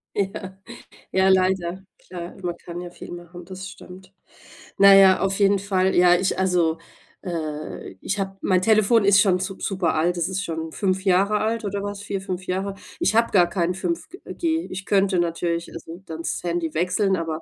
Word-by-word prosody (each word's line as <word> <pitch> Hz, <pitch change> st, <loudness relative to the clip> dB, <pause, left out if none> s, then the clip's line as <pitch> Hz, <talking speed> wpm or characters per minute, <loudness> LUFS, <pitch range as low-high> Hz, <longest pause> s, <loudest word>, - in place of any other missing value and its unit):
Ja. 190 Hz, -1 st, -3 dB, 0.5 s
Ja, 190 Hz, 0 st, +3 dB
leider, 185 Hz, -1 st, +1 dB, 0.2 s
klar, 175 Hz, -1 st, -9 dB
man 175 Hz, -1 st, -2 dB
kann 175 Hz, 0 st, -8 dB
ja 175 Hz, -, -7 dB
viel 175 Hz, -, -11 dB
machen, 175 Hz, 0 st, -10 dB
das 190 Hz, +1 st, -8 dB
stimmt. 185 Hz, -1 st, -13 dB, 0.7 s
Na 200 Hz, 0 st, +8 dB
ja, 190 Hz, -1 st, +7 dB
auf 195 Hz, 0 st, 0 dB
jeden 200 Hz, 0 st, +4 dB
Fall, 190 Hz, -1 st, +1 dB
ja, 175 Hz, 0 st, +6 dB
ich 185 Hz, +1 st, 0 dB
also, 175 Hz, -3 st, +2 dB, 0.5 s
äh 155 Hz, -5 st, -5 dB
ich 200 Hz, +2 st, -2 dB
habe 195 Hz, 0 st, -3 dB
mein 185 Hz, -1 st, +2 dB
Telefon 215 Hz, +1 st, +4 dB
ist 200 Hz, 0 st, +6 dB
schon 190 Hz, -3 st, +3 dB
sup 190 Hz, +1 st, -5 dB
super 185 Hz, -4 st, 0 dB
alt, 175 Hz, +3 st, +1 dB
das 170 Hz, -1 st, 0 dB
ist 190 Hz, +1 st, -2 dB
schon 160 Hz, -2 st, -4 dB
5 190 Hz, -1 st, -1 dB
Jahre 195 Hz, +3 st, +3 dB
alt 225 Hz, +1 st, -1 dB
oder 200 Hz, 0 st, -3 dB
was? 205 Hz, 0 st, -5 dB
4, 200 Hz, -1 st, -3 dB
5 185 Hz, -1 st, -5 dB
Jahre. 190 Hz, +2 st, -2 dB, 0.3 s
Ich 200 Hz, -, +1 dB
habe 230 Hz, +1 st, +3 dB
gar 180 Hz, -3 st, +5 dB
kein 175 Hz, 0 st, 0 dB
5G 340 Hz, -, -4 dB, 0.2 s
G. 325 Hz, -1 st, -1 dB
Ich 190 Hz, +1 st, -6 dB
könnte 195 Hz, -2 st, +2 dB
natürlich, 170 Hz, 0 st, -2 dB
also, 165 Hz, +2 st, -9 dB
dann 160 Hz, 0 st, -7 dB
das -, -, -2 dB
Handy 170 Hz, -2 st, -2 dB
wechseln, 185 Hz, +4 st, +1 dB
aber 165 Hz, -1 st, -4 dB
185 Hz, 190 wpm, -23 LUFS, 175-195 Hz, 0.7 s, Na